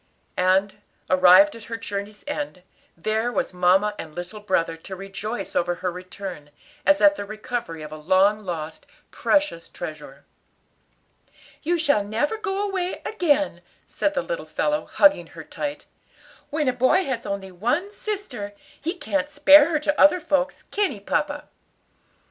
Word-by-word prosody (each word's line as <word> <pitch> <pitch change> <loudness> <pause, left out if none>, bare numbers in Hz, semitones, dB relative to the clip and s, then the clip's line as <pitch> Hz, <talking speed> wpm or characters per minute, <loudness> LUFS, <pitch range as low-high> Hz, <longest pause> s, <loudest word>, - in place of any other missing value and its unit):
And, 190 +2 +2 0.3
arrived 185 +11 +7
at 230 - -11
her 230 - -5
journey's 205 -1 -6
end, 290 -10 -4 0.3
there 220 +7 0
were - - 0
mamma 185 +4 +3
and 155 -2 -8
little 180 +5 -6
brother 185 -5 0
to 190 +4 -8
rejoice 195 +1 -5
over 175 0 +1
her 180 0 -2
return, 180 -3 -8 0.4
as 295 0 +5
at 300 0 +6
the - - -3
recovery 215 -6 -5
of 150 - -8
a 155 - -7
long 190 +6 +3
lost, 160 -4 -6 0.2
precious 295 - 0
treasure. 150 -3 -8 1.4
"You 345 +3 +1
shall 285 -10 +2
never 230 - -1
go 405 -1 -1
away 370 -2 -3
again," 300 -8 +1 0.2
said - - -1
the - - 0
little - - -4
fellow, 300 0 -1
hugging 295 0 +4
her - - -10
tight. 295 0 -5 0.6
"When 300 -1 -1
a 255 - +3
boy 260 +10 +3
has 255 -4 -3
only 195 -1 -4
one 245 - -1
sister, 285 - -5 0.3
he 335 +5 -2
can't 295 -4 -2
spare 295 +1 +7
her 310 -3 +1
to 295 0 +1
other 295 +5 +7
folks, 290 -3 -1
can 410 -1 +1
he, 215 - -8
papa?" 295 +8 -2
225 Hz, 155 wpm, -24 LUFS, 185-295 Hz, 1.4 s, arrived